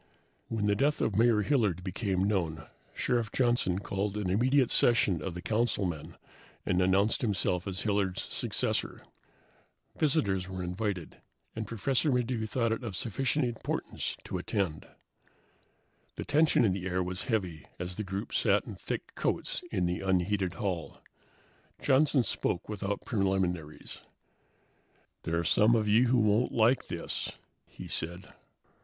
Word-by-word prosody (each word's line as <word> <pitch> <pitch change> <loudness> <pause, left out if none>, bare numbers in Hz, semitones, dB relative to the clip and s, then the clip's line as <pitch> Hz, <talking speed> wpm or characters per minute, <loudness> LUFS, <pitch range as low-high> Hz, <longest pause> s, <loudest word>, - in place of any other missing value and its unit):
When 110 -2 -1
the 105 0 +3
death 145 +7 +1
of 105 - 0
Mayor 110 -1 +4
Hilliard 105 - +1
became 95 0 -1
known, 85 -7 -1 0.3
Sheriff 120 -3 0
Johnson 120 -8 +2
called 100 +1 -2
an 100 -4 -1
immediate 130 +5 +3
session 105 -8 +4
of 90 -3 -4
the 90 - -6
councilmen 105 -8 -1 0.5
and 90 +1 +2
announced 95 +4 +3
himself 95 -4 0
as 95 -1 -2
Hilliard's 100 -3 0
successor. - - -2 0.9
Visitors 100 - +1
were 95 -1 -4
invited, 90 -1 -3 0.4
and 110 -1 -4
Professor 130 +6 +1
Maddox 120 -3 0
thought 115 -2 +1
it 115 - -2
of 110 -5 -4
sufficient 135 +7 0
importance 120 -2 -3
to - - -4
attend. 95 -7 -2 1.3
The - - -5
tension 150 -3 +4
in 95 - +2
the 95 -1 -4
air 90 0 0
was 90 +1 -4
heavy 95 - -2
as 90 +1 -4
the 110 - -3
group 95 0 -5
sat - - +2
in - - -7
thick - - -5
coats - - -2
in 90 - +1
the 90 0 -1
unheated 95 0 0
hall. 95 -7 -3 0.8
Johnson 135 -1 +3
spoke 90 - -1
without 100 -1 -3
preliminaries. 95 - -1 1.3
"There 85 +1 0
are 85 - 0
some 105 +8 +4
of 110 -2 +1
you 115 +4 +5
who 125 +1 +3
won't 110 +2 +3
like 115 +3 +3
this," - - -3 0.3
he - - -10
said. 85 +3 -4
100 Hz, 145 wpm, -30 LUFS, 90-115 Hz, 1.3 s, you